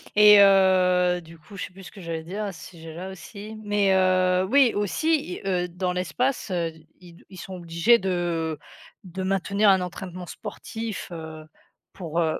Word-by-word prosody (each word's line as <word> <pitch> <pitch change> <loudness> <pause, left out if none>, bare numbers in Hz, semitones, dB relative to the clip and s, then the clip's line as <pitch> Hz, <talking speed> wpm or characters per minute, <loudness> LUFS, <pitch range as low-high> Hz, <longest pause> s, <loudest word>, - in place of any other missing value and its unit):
et 210 0 +8
heu, 180 -2 +4
du 165 0 -15
coup, 160 +6 -15
je - - -3
sais - - -13
plus 195 0 -13
ce 160 - -11
que 195 - -12
j'allais 165 -1 -5
dire 200 +5 -5
à 200 - -4
ce - - -11
sujet-là 165 +2 -9
aussi, 210 +3 -10
mais 205 -2 +2
heu, 185 0 +3
oui, 270 -2 +5
aussi 210 - 0
i - - -11
heu, 180 -2 0
dans 180 +1 -3
l'espace, 200 - -1
heu, 170 -3 -2 0.3
ils 175 -2 -16
ils 185 - -12
sont 190 - -8
obligés 170 +7 +3
de 170 -4 -2 0.5
de 190 +1 -7
maintenir 195 +2 +1
un 190 -1 +4
entraînement 180 0 -7
sportif, 225 +5 -7
heu, 160 -2 -8 0.5
pour, 170 -2 -4
heu 160 -2 0
185 Hz, 180 wpm, -25 LUFS, 170-200 Hz, 0.5 s, et